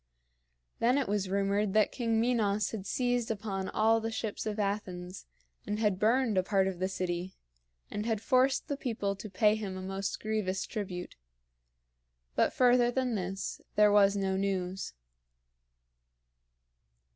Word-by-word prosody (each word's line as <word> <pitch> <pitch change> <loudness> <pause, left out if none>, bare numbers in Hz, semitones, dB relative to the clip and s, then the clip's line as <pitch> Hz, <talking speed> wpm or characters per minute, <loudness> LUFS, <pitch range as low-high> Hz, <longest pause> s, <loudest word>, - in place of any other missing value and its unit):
Then 245 +4 +3
it 275 - 0
was 200 -1 -1
rumored 200 +1 +1
that 215 -1 +4
King 230 -3 0
Minos 215 -4 +1
had 205 -3 -5
seized 245 -2 0
upon 195 -3 -3
all 225 +1 +3
the 225 - -2
ships 220 -1 -4
of 210 0 -2
Athens, 195 -3 -3 0.4
and 210 0 -1
had 210 -4 +1
burned 225 -1 +3
a - - +4
part 190 0 +2
of 185 -2 -4
the 185 - +1
city, 185 -1 -3 0.6
and 210 +2 -3
had 225 -3 0
forced 255 +4 +2
the 285 - -1
people 220 -7 -2
to 210 +2 -8
pay 210 +2 +3
him 205 -3 -4
a - - -5
most 195 +1 -3
grievous 215 -3 -1
tribute. 185 -5 -5 1.2
But - - +3
further 245 -1 +4
than 250 0 0
this 195 -1 -3
there 210 -1 +6
was 200 -1 +5
no 190 -1 0
news. 190 - -2
205 Hz, 150 wpm, -31 LUFS, 190-225 Hz, 1.2 s, there